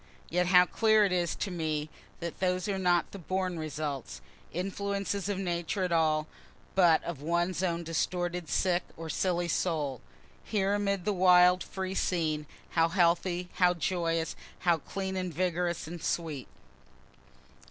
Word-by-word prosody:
Yet 180 +1 +1
how 180 0 +7
clear 215 +2 +4
it 195 - 0
is 175 -2 0
to 195 - -3
me 155 -3 -2 0.3
that 170 -1 -5
those 185 0 0
are 195 -2 -1
not 175 -2 +2
the 200 - -8
born 185 0 -2
results, 145 - -4 0.3
influences 200 +2 -2
of 200 - -1
Nature 175 +1 -2
at 180 - -1
all, 155 -2 +2 0.5
but 175 -4 +5
of 170 -5 -5
one's 170 +3 0
own 170 -2 0
distorted, 175 +1 -2
sick 180 -1 +2 0.2
or 165 -1 -5
silly 175 -2 0
soul. 150 -7 -1 0.4
Here, 200 -2 0
amid 200 -3 0
this 210 - +1
wild, 180 -1 +6
free 190 0 -4
scene, 155 -6 0 0.2
how 165 0 +3
healthy, 175 0 +1
how 180 -1 +4
joyous, 165 -2 -1 0.3
how 170 -3 +3
clean 190 +4 -4
and 185 -1 -2
vigorous 175 0 -1
and 170 +1 -7
sweet! 155 -6 -2
175 Hz, 150 wpm, -30 LUFS, 165-185 Hz, 0.5 s, how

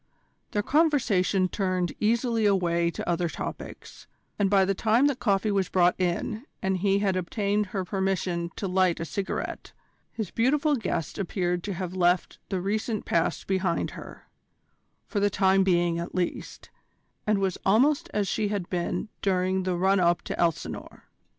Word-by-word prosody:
Their 205 - -1
conversation 235 - +2
turned 185 -2 -1
easily 230 0 +2
away 170 -3 +2
to - - -6
other 175 0 0
topics, - - -8 0.3
and 200 -1 +3
by 195 -1 +4
the 195 - +1
time 225 +6 +3
that 285 -3 +1
coffee 205 0 +1
was 195 -2 0
brought 180 -1 +4
in 185 +5 -1 0.2
and 190 0 0
he 195 +1 +2
had 200 -2 +1
obtained 200 +3 0
her 190 0 -3
permission 185 -3 -1
to 200 - -3
light 185 -2 +2
a 165 - -3
cigarette, 195 +4 -4 0.4
his 220 -5 -5
beautiful 285 +5 +2
guest 190 - -3
appeared 180 -2 -1
to 200 -2 -3
have 180 0 -4
left 180 -1 +1
the 190 - -1
recent 215 +3 -2
past 165 -1 0
behind 185 -3 0
her, - - -11 0.8
for 205 - -2
the 205 0 +3
time 195 -1 +3
being 175 -2 +2
at 170 - -6
least, 180 -1 -4 0.6
and 210 -1 +3
was 195 -2 -1
almost 260 +9 +3
as 205 -1 0
she 210 +3 0
had 200 -4 -3
been 180 +3 -2
during 185 -1 +1
the 185 -1 -1
run 190 +2 +3
up 175 -1 +2
to - - -5
Elsinore. 170 -2 -2
190 Hz, 165 wpm, -27 LUFS, 180-210 Hz, 0.8 s, by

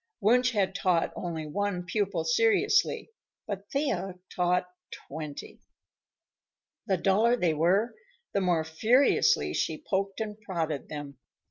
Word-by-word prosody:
Wunsch 245 +4 +3
had 195 -3 +1
taught 180 -4 +1
only 165 -3 -4
one 180 +3 -2
pupil 195 -3 -1
seriously, 230 - +2 0.3
but 200 -1 -6
Thea 200 -11 -1 0.2
taught 180 0 +2 0.4
twenty. 150 -1 -8 1.3
The 190 - +2
duller 210 +7 +3
they 175 -9 +1
were, 185 +9 +2 0.4
the 200 - +1
more 175 -4 +2
furiously 240 - +3
she - - -1
poked 195 +1 -1
and 215 -1 -5
prodded 165 -8 -3
them. 145 -3 -7
190 Hz, 120 wpm, -28 LUFS, 165-215 Hz, 1.3 s, Wunsch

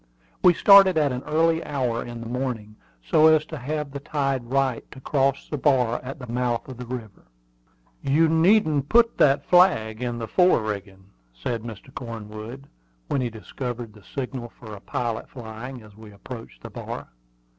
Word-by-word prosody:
We 180 -2 +6
started 195 -3 +7
at 150 -3 +3
an 125 0 -3
early 165 +1 +2
hour 125 -5 -1
in 120 -1 -8
the - - -7
morning, 120 -4 -4 0.3
so 155 - +5
as 155 -1 +5
to - - -7
have 150 +2 -3
the 140 - -5
tide 135 -3 -1
right 130 -1 0
to 135 - -12
cross 135 0 0
the 150 - -4
bar 125 -5 +2
at 135 +2 -6
the 125 - -8
mouth 120 0 -1
of 130 -3 -9
the 125 -1 -8
river. 115 - -8 0.7
"You 155 +4 +3
needn't 160 -3 +3
put 230 0 +4
that 140 -1 +4
flag 125 - +4
in 120 -1 -2
the 115 -1 -4
fore 180 -8 +4
rigging," 100 -2 -6 0.2
said 115 - -3
Mr. 115 +3 -10
Cornwood, 115 +2 -8 0.4
when 140 - +1
he 125 - -1
discovered 115 +1 -6
the 105 - -16
signal 125 +1 -5
for 110 -2 -12
a 100 - -9
pilot 115 -2 -3
flying, 120 +1 -8
as 105 -2 -16
we 110 0 -13
approached 115 +4 -10
the - - -8
bar. - - -7
125 Hz, 175 wpm, -24 LUFS, 115-145 Hz, 0.7 s, started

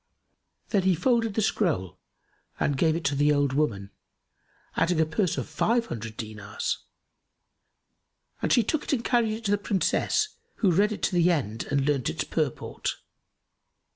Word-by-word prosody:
Then 200 - +2
he 185 -1 +3
folded 230 +3 +1
the 220 - +2
scroll 150 - 0 0.6
and 145 - +1
gave 160 +3 +2
it 170 - -3
to 140 - +1
the 145 +1 +3
old 145 -2 +2
woman, 100 -10 -1 0.8
adding 170 0 +2
a 160 - +4
purse 165 +1 0
of 130 - -3
five 230 +10 +1
hundred 110 - -6
dinars; 105 -3 -4 1.6
and - - 0
she 240 - +5
took 300 +8 0
it - - -1
and 235 -4 -1
carried 235 -3 +2
it 220 +1 -7
to 200 - +1
the 205 - +2
Princess, 205 - +1 0.3
who 195 -5 +2
read 200 +5 +3
it 215 - -5
to - - +1
the 175 0 +4
end 120 - -1
and 140 -1 +1
learned 140 -4 +1
its - - -2
purport. - - -2
165 Hz, 170 wpm, -27 LUFS, 140-215 Hz, 1.6 s, she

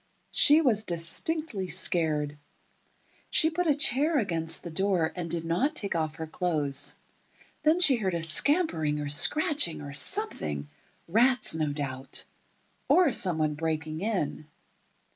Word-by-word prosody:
She 300 +2 +5
was 225 -8 +1
distinctly 195 - -3
scared. 155 -4 0 0.9
She 320 - +3
put 355 +2 -1
a 295 - +3
chair 295 +2 +2
against 165 - -1
the 170 - -7
door, 185 -2 0
and 175 -2 -5
did 165 0 -3
not 250 - 0
take 200 -8 -2
off 160 -1 -2
her 160 - -6
clothes. 145 -4 0 0.6
Then 315 +3 +3
she 285 -8 +5
heard 190 -5 -2
a 170 - -2
scampering 165 - +1
or 145 -1 -4
scratching, 280 - +3
or 145 -1 -8
something—rats, 195 - -1
no 155 -2 -1
doubt. 135 -2 -4 0.6
Or 355 -6 +5
somebody 160 -8 0
breaking 160 +1 -4
in. 185 -8 -3
170 Hz, 130 wpm, -27 LUFS, -, 0.9 s, She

